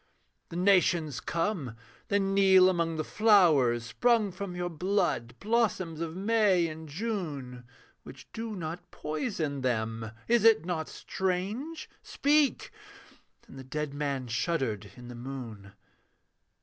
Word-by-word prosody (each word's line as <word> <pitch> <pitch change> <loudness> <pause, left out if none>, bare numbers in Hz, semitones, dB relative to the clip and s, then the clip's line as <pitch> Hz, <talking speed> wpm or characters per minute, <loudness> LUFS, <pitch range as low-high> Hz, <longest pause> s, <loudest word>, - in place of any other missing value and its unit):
The - - -8
nations 175 -5 +2
come; 165 - -2 0.3
they 200 - +2
kneel 195 -1 +5
among 170 -3 -1
the 155 - -1
flowers 155 - +4
Sprung 215 - +2
from 185 0 -6
your 175 0 -2
blood, 175 - -1
blossoms 200 -7 0
of 165 0 -4
May 200 -3 +3
and 160 0 -8
June, 145 - -4 0.4
Which 130 - -13
do 225 -1 -5
not 175 0 -6
poison 155 - -3
them 110 -3 -2 0.2
is 235 -2 +3
it 225 -8 +5
not 165 -3 -3
strange? 205 - -3
Speak!' 290 0 +1 0.8
And 135 - -12
the - - -8
dead 150 +2 -4
man 140 -3 -2
shuddered 115 - -1
in 125 -2 -11
the 120 - -8
moon. 120 -5 -8
170 Hz, 125 wpm, -29 LUFS, 135-200 Hz, 0.8 s, kneel